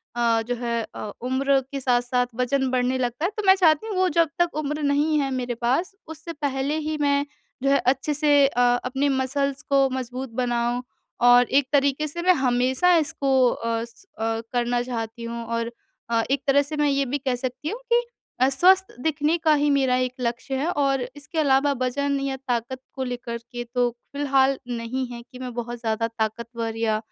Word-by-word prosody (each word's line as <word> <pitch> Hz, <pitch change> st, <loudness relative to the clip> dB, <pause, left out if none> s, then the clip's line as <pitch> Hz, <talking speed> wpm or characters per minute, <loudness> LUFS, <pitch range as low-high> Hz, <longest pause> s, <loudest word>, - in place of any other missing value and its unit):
अ, 230 Hz, -1 st, +2 dB
जो 245 Hz, -, -1 dB
है 235 Hz, -1 st, -1 dB
अ, 210 Hz, -, -5 dB
उम्र 270 Hz, +2 st, +2 dB
के 280 Hz, -, -3 dB
साथ-साथ 245 Hz, -1 st, +1 dB
वजन 260 Hz, +2 st, 0 dB
बढ़ने 255 Hz, 0 st, +1 dB
लगता 250 Hz, +4 st, -2 dB
है। 375 Hz, -, 0 dB
तो 425 Hz, -, -2 dB
मैं 380 Hz, -, +8 dB
चाहती 340 Hz, +1 st, +3 dB
हूँ 425 Hz, -, -3 dB
वो 370 Hz, 0 st, +3 dB
जब 330 Hz, -2 st, +4 dB
तक 345 Hz, -2 st, +1 dB
उम्र 300 Hz, +1 st, -3 dB
नहीं 290 Hz, +2 st, +2 dB
है 275 Hz, -1 st, 0 dB
मेरे 250 Hz, -2 st, -2 dB
पास 325 Hz, -, +1 dB
उससे 320 Hz, +1 st, -8 dB
पहले 285 Hz, -1 st, -1 dB
ही 310 Hz, 0 st, -1 dB
मैं 285 Hz, 0 st, +2 dB, 0.4 s
जो 275 Hz, -, +3 dB
है 280 Hz, -, +5 dB
अच्छे 270 Hz, +3 st, -2 dB
से 290 Hz, -1 st, +4 dB
अ, 245 Hz, -2 st, -1 dB, 0.2 s
अपने 270 Hz, +3 st, 0 dB
मसल्स 275 Hz, +1 st, -1 dB
को 275 Hz, -1 st, +4 dB
मज़बूत 255 Hz, 0 st, -4 dB
बनाऊँ। 240 Hz, 0 st, 0 dB, 0.4 s
और 245 Hz, 0 st, +7 dB
एक 285 Hz, -, -3 dB
तरीके 280 Hz, +1 st, +2 dB
से 340 Hz, +4 st, -4 dB
मैं 365 Hz, +1 st, +5 dB
हमेशा 260 Hz, +4 st, +2 dB
इसको 295 Hz, -3 st, -1 dB, 0.2 s
अ 230 Hz, -1 st, -2 dB
अ, -, -, -4 dB, 0.4 s
करना 235 Hz, +2 st, -1 dB
चाहती 235 Hz, -1 st, -5 dB
हूँ 235 Hz, 0 st, -5 dB
और 230 Hz, 0 st, -2 dB, 0.4 s
अ, 230 Hz, -1 st, +2 dB
एक 275 Hz, -1 st, +1 dB
तरह 280 Hz, +1 st, +5 dB
से 285 Hz, +2 st, -5 dB
मैं 295 Hz, -1 st, +2 dB
ये 275 Hz, 0 st, +1 dB
भी 270 Hz, +3 st, -1 dB
कह 260 Hz, -2 st, -1 dB
सकती 255 Hz, +4 st, -4 dB
हूँ 450 Hz, -, -5 dB
कि 480 Hz, -, +5 dB, 0.4 s
अ, 260 Hz, +1 st, +4 dB
स्वस्थ 370 Hz, +8 st, +4 dB
दिखने 310 Hz, +2 st, +1 dB
का 320 Hz, -2 st, +3 dB
ही 295 Hz, 0 st, +2 dB
मेरा 270 Hz, -3 st, +3 dB
एक 250 Hz, -, -13 dB
लक्ष्य 245 Hz, +3 st, -2 dB
है 285 Hz, +5 st, -1 dB
और 275 Hz, -4 st, +1 dB
इसके 290 Hz, +3 st, -5 dB
अलावा 285 Hz, -1 st, +3 dB
वजन 280 Hz, +2 st, 0 dB
या 275 Hz, -1 st, -2 dB
ताकत 245 Hz, +1 st, -2 dB, 0.2 s
को 265 Hz, -, -2 dB
लेकर 245 Hz, -2 st, -4 dB
के 240 Hz, -1 st, -4 dB
तो 245 Hz, -1 st, +3 dB, 0.2 s
फ़िलहाल 275 Hz, -1 st, +2 dB, 0.2 s
नहीं 240 Hz, +3 st, -3 dB
है 235 Hz, -1 st, -7 dB
कि 255 Hz, +1 st, -14 dB
मैं 250 Hz, -1 st, -6 dB
बहुत 240 Hz, 0 st, -5 dB
ज़्यादा 230 Hz, 0 st, -1 dB
ताकतवर 230 Hz, 0 st, -4 dB
या 220 Hz, -1 st, +1 dB
265 Hz, 195 wpm, -24 LUFS, 245-285 Hz, 0.4 s, मैं